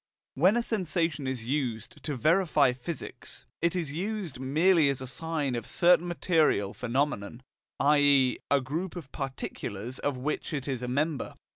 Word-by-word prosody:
When 185 - +4
a 240 - +1
sensation 165 - -1
is 130 -4 -3
used 120 -5 -3
to 150 - -2
verify 155 - +3
physics, 130 +5 -7 0.2
it 170 +1 +1
is 165 -6 -2
used 185 - -3
merely 155 +4 +4
as 140 - -1
a 130 - -5
sign 150 0 -2
of 120 -2 -3
a - - -12
certain 175 0 +4
material 160 - +2
phenomenon, 125 -2 -2 0.4
i.e. 140 -3 +4
of 140 - +5
a - - -1
group 160 +9 -4
of 160 -7 -8
particulars 130 -4 -5
of 145 -2 -1
which 150 +5 -3
it 140 -2 -4
is 130 -3 -2
a 125 - -3
member. 145 +4 -1
145 Hz, 165 wpm, -28 LUFS, 130-165 Hz, 0.4 s, of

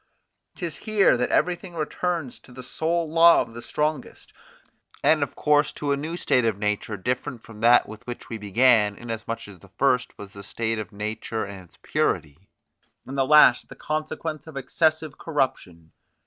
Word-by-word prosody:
'Tis 170 -6 -5
here 215 - +3
that 125 0 -1
everything 180 0 0
returns 165 -2 -3
to - - -19
the 130 +1 -10
sole 165 +5 -1
law 165 +2 +6
of 115 - -3
the 120 - -8
strongest, 150 +4 -3 0.7
and 155 -1 +4
of 140 - -2
course 150 -1 +2
to 145 -1 -3
a - - +3
new 155 +5 -5
state 125 -7 +2
of 110 -3 0
nature 105 +1 -2
different 125 +3 -3
from 110 -2 -13
that 120 +1 +5
with 110 +2 -12
which 120 - -7
we 115 - -6
began, 105 0 +3
in 120 +2 -8
as 115 0 -6
much 115 -2 -5
as 95 -3 -13
the 100 - -18
first 125 -3 +1
was 100 -1 -10
the 100 - -10
state 110 +2 -3
of 105 0 -6
nature 110 +2 -4
in 100 -1 -9
its 90 -2 -17
purity, 75 +7 -2 0.6
and 135 - -7
the 135 - +2
last 150 -5 +6
the - - -11
consequence 155 0 -4
of 155 -3 -9
excessive 155 +2 0
corruption. 95 - -3
125 Hz, 185 wpm, -24 LUFS, 110-155 Hz, 0.7 s, law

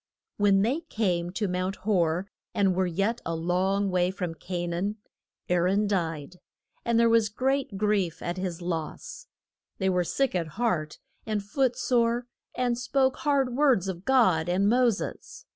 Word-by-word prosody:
When 200 -1 +4
they 255 +8 +1
came 190 - -1
to 205 +1 -1
Mount 185 +1 -2
Hor 180 -3 0 0.3
and 195 -2 +3
were 185 0 +1
yet 200 +7 -1
a 165 - -2
long 185 +4 0
way 180 0 +2
from 180 -3 -4
Ca 175 +2 -4
naan, 175 +5 -2 0.5
Aa 180 - +2
ron 190 +4 +2
died, 170 -4 -2 0.4
and 235 -1 +2
there 235 - +5
was 225 -2 +3
great 260 -1 -1
grief 200 -5 0
at 175 +1 -3
his 180 -2 -4
loss. 330 - -5 0.5
They 190 -1 +1
were 180 -1 +2
sick 270 +9 0
at 175 -3 -1
heart 175 -11 -1 0.3
and 210 -2 -1
foot 250 +4 0
sore, 240 -1 +1 0.3
and 245 -1 0
spoke 260 +1 +1
hard 275 -4 +1
words 260 -9 +3
of 180 -2 -5
God 185 -11 +3
and 190 +3 +2
Mo 245 +2 +4
ses. 210 - -6
195 Hz, 165 wpm, -27 LUFS, 180-235 Hz, 0.5 s, there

